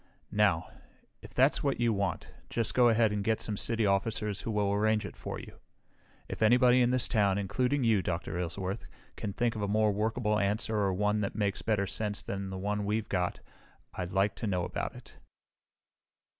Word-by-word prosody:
"Now, 100 -6 +2 0.5
if - - -12
that's 135 +3 +4
what 140 -3 0
you 120 -1 +2
want, 100 -1 -2 0.2
just 115 -2 0
go 125 -1 +5
ahead 110 -1 +3
and 105 -1 -1
get 110 +1 +1
some 105 - -2
city 115 +2 +1
officers 105 +1 0
who - - -5
will 105 -2 +1
arrange 110 +1 +2
it - - -8
for - - -6
you. - - -12 0.7
If - - -7
anybody 125 +3 +5
in 120 - +4
this 125 -1 +1
town, 100 -4 +2
including 125 +8 0
you, 110 -4 +3
Dr. 90 -1 -3
Aylesworth, 95 +4 -3 0.3
can 100 - -4
think 120 +2 0
of 110 - -4
a 100 - 0
more 105 +1 +2
workable 105 +1 0
answer 105 +2 0
or 100 -2 +2
one 105 +3 +1
that 100 - -3
makes 100 -3 -1
better 105 -3 +1
sense 105 +1 -3
than 100 0 -4
the 95 - -5
one 105 +2 -2
we've 105 +2 -1
got 90 -2 -1 0.5
I'd 90 -1 -4
like 95 +2 +1
to 115 - -3
know 90 -3 0
about - - -4
it." - - -14
105 Hz, 195 wpm, -30 LUFS, 100-115 Hz, 0.7 s, go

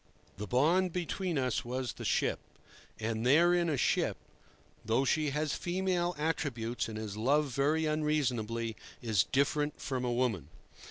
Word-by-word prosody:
The 105 +2 -5
bond 165 - +3
between 180 -1 -2
us 130 -3 0
was 125 +1 -3
the - - -8
ship; - - +1 0.6
and 110 0 -2
therein 170 +6 +4
a 145 - 0
ship, - - +1 0.7
though 115 +5 +1
she 155 +2 +2
has 150 +1 -1
female 180 -1 -1
attributes 130 -8 -2
and 110 - -6
is 105 -2 -5
loved 140 +5 +2
very 150 +4 +2
unreasonably, 125 -8 0 0.3
is 110 -5 +2
different 145 +2 0
from 130 -3 -3
a 125 - 0
woman. 120 - 0
140 Hz, 145 wpm, -32 LUFS, 115-155 Hz, 0.7 s, therein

